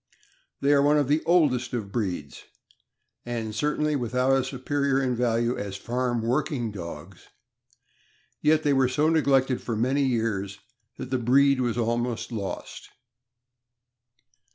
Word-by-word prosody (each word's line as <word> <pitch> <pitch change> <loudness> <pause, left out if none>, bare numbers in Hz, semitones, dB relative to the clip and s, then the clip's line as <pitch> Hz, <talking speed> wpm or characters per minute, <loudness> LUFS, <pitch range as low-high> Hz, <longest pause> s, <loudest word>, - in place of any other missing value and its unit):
They 140 +1 +3
are 140 - +4
one 145 +1 +4
of 145 -3 +1
the 150 +3 +2
oldest 145 -9 +2
of 105 -5 -4
breeds, 90 -10 -4 0.8
and 115 -3 -4
certainly 150 +4 0
with 125 -3 -3
out 130 +1 +3
a 135 - +1
superior 135 +1 -1
in 130 -2 0
value 120 0 +1
as 100 -1 -5
farm 120 +2 -2
working 125 -1 -1
dogs; 85 -1 -9 1.1
yet 155 +1 +3
they 145 - +2
were 135 -2 +3
so 150 +4 +2
neglected 135 -5 +2
for 115 - -3
many 130 +6 +1
years 110 -6 -1 0.4
that 130 -1 -7
the 130 - +1
breed 135 +3 +3
was 120 -2 -1
almost 120 +1 -1
lost. 100 -4 -6
125 Hz, 140 wpm, -26 LUFS, 115-140 Hz, 1.1 s, are